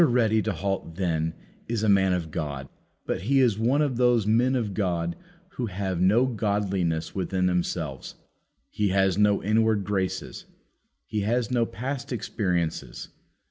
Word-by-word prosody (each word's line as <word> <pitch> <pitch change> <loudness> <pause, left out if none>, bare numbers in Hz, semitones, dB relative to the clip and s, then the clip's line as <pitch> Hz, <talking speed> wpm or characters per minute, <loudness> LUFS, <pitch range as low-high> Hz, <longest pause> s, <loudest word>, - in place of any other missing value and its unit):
Ready 115 -6 +3
to 105 - -1
halt, 95 -2 -3
then, 80 -3 -1 0.3
is 115 -2 -1
a - - +2
man 95 -2 +4
of 85 -3 -3
God; 70 -5 -4 0.4
but - - -2
he 135 +8 +2
is 115 -6 +3
one 130 +7 +3
of 135 -5 -1
those 120 -3 +3
men 120 +5 +3
of 110 -6 -1
God 85 -4 -1 0.3
who 125 -11 -4
have 95 -2 -3
no 105 +7 +4
godliness 100 -8 -1
within 95 -1 -1
themselves. 85 -6 -2 0.6
He 105 - 0
has 95 0 +2
no 105 -1 +3
inward 110 0 +2
graces. 95 -1 -3 0.6
He 105 - -3
has 115 +3 0
no 120 -2 +2
past 125 +7 -5
experiences. 90 -8 -2
100 Hz, 150 wpm, -26 LUFS, 90-115 Hz, 0.6 s, man